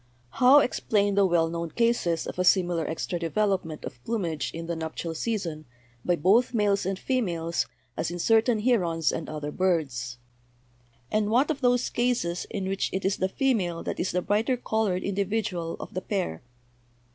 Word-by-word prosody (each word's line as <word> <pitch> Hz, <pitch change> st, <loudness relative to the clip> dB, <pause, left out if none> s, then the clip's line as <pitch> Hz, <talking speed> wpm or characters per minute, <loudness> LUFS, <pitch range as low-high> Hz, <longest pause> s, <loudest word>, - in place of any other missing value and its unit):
"How 255 Hz, -, +6 dB
explain 205 Hz, -5 st, +1 dB
the 200 Hz, -1 st, +4 dB
well 170 Hz, -2 st, +3 dB
known 170 Hz, 0 st, -3 dB
cases 230 Hz, -7 st, +1 dB
of -, -, -6 dB
a -, -, +3 dB
similar 175 Hz, -3 st, +3 dB
extra 165 Hz, +2 st, -3 dB
development 170 Hz, -2 st, -1 dB
of 120 Hz, -2 st, -9 dB
plumage 170 Hz, -11 st, -2 dB
in 165 Hz, 0 st, -6 dB
the 170 Hz, 0 st, -3 dB
nuptial 160 Hz, +1 st, -4 dB
season 165 Hz, -5 st, -3 dB, 0.4 s
by 175 Hz, -, +2 dB
both 215 Hz, +10 st, +3 dB
males 200 Hz, -3 st, +2 dB
and 195 Hz, 0 st, -1 dB
females, 175 Hz, -10 st, -1 dB, 0.3 s
as -, -, -2 dB
in 175 Hz, -, -5 dB
certain 225 Hz, +4 st, +3 dB
herons 175 Hz, -10 st, +2 dB
and 160 Hz, -, -4 dB
other 150 Hz, -1 st, -4 dB
birds? 140 Hz, -10 st, -1 dB, 0.9 s
And 210 Hz, -1 st, +1 dB
what 260 Hz, +8 st, +3 dB
of 290 Hz, -2 st, -4 dB
those 245 Hz, -1 st, +2 dB
cases 240 Hz, -8 st, 0 dB
in 195 Hz, -2 st, -3 dB
which 195 Hz, 0 st, -1 dB
it 190 Hz, 0 st, -3 dB
is 195 Hz, -, +1 dB
the 190 Hz, -, 0 dB
female 190 Hz, -9 st, 0 dB
that -, -, -4 dB
is 180 Hz, -, 0 dB
the 180 Hz, 0 st, -1 dB
brighter 225 Hz, +5 st, +1 dB
colored 220 Hz, -6 st, 0 dB
individual 195 Hz, -4 st, -2 dB
of -, -, -8 dB
the 185 Hz, -, -3 dB
pair? 185 Hz, -, -2 dB
185 Hz, 170 wpm, -27 LUFS, 165-220 Hz, 0.9 s, How